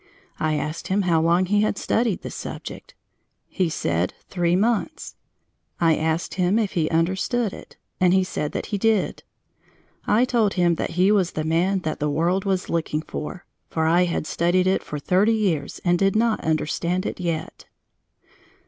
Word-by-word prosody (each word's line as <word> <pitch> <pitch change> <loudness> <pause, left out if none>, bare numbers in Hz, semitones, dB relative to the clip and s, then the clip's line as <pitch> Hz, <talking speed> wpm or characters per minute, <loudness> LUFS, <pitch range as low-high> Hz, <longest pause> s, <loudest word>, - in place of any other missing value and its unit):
I 155 0 +1
asked 155 +2 -4
him 195 +1 +1
how 170 -3 +2
long 170 +3 +3
he 205 +2 +2
had 215 -2 0
studied 225 -3 0
the - - -6
subject. - - -8 0.5
He 185 -3 -1
said 85 - -1
"three 175 -2 +1
months." 230 - -1 0.6
I 165 -2 +4
asked 160 +2 -1
him 185 +2 +1
if 215 -4 0
he 160 -3 0
understood 190 +7 0
it - - -12 0.2
and 180 -1 +4
he 190 0 +4
said 150 -5 -3
that - - -3
he 205 - 0
did. 220 -2 +1 0.9
I 230 +4 +4
told 230 -5 +1
him 175 -2 +3
that - - -2
he 185 +3 +4
was 190 -4 +2
the 155 - -2
man 175 +5 +1
that 155 -2 -3
the 150 - 0
world 170 +6 0
was 190 -2 0
looking 160 -2 -1
for; 175 +4 -6 0.2
that - - -5
I 170 +3 +4
had 170 -2 -2
studied 175 +3 +1
it 190 +1 +2
for 150 - -5
thirty 190 +9 +2
years 175 -10 -1
and 175 0 +3
did 195 0 +2
not 225 0 +1
understand 170 +4 -1
it - - -4
yet. 165 -3 -4
180 Hz, 175 wpm, -23 LUFS, 160-195 Hz, 0.9 s, I